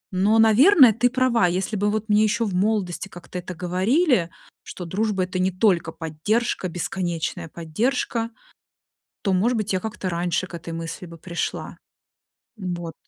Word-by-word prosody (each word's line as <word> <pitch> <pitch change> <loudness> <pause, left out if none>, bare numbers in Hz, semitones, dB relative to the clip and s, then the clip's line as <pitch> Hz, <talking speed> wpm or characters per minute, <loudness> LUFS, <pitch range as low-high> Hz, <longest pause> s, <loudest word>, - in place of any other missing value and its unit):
Но, 205 +4 +3
наверное, 250 - +7
ты 245 +3 +2
права, 250 -6 +2
если 185 +5 -1
бы 205 +1 +1
вот 215 +1 -2
мне 210 0 +4
еще 220 +2 +1
в 200 - -3
молодости 190 -2 0
как-то 180 -1 -8
это 180 0 -7
говорили, 190 - +2 0.3
что 180 - -8
дружба- 195 +2 0
это 185 0 -3
не 185 +1 +2
только 185 -3 +2
поддержка, 185 +8 -1
бесконечная 175 -1 -3
поддержка, 225 - -1 0.9
то, 195 - +1
может 230 +6 +2
быть, 215 -1 -1
я - - +2
как-то 210 -3 -4
раньше 175 +1 -1
к 180 - -13
этой 170 0 -7
мысли 165 +2 -6
бы 165 0 -12
пришла. 170 +1 -4 0.8
М, 185 -4 -3
вот. 170 -2 -6
190 Hz, 160 wpm, -23 LUFS, 175-220 Hz, 0.9 s, наверное